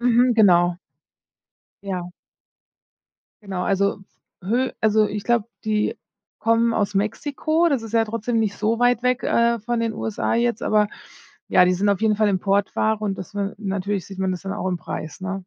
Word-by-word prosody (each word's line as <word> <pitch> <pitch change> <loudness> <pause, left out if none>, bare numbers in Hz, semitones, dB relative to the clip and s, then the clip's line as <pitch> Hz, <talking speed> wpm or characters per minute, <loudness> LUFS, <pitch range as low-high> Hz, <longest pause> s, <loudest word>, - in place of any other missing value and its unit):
mhm, 245 +1 +3
genau. 175 -5 +4 1.1
Ja. 180 -3 -4 1.3
Genau, 190 -3 -3
also, 200 +1 +1 0.5
hö 245 +7 +1
also, 215 0 +3
ich 205 0 -5
glaube, 235 -3 +1 0.2
die 215 -1 0 0.4
kommen 230 +1 +2
aus 205 -2 0
Mexiko, 290 +11 0
das 275 -6 0
ist 225 -1 -8
ja 225 -1 +3
trotzdem 230 +2 -2
nicht 210 -3 0
so 220 +2 0
weit 245 0 +3
weg, 250 0 0
äh, 235 0 +2
von 235 +2 -2
den 230 -1 -1
USA 220 0 -2
jetzt, 235 -1 0
aber 210 -1 +2 0.6
ja, 180 - +5
die 180 - +3
sind 200 +3 +1
auf 200 -1 +1
jeden 220 -1 +3
Fall 215 0 +2
Importware 200 +3 +1
und 195 -2 -2
das 185 - -8
ne 200 -1 -3
Natürlich 200 -2 -3
sieht 195 -1 -10
man 190 -1 0
das 180 - -5
dann 195 0 -4
auch 205 -2 -3
im 180 -1 -1
Preis, 155 0 -7
ne? 195 +1 -3
210 Hz, 180 wpm, -22 LUFS, 195-230 Hz, 1.3 s, ja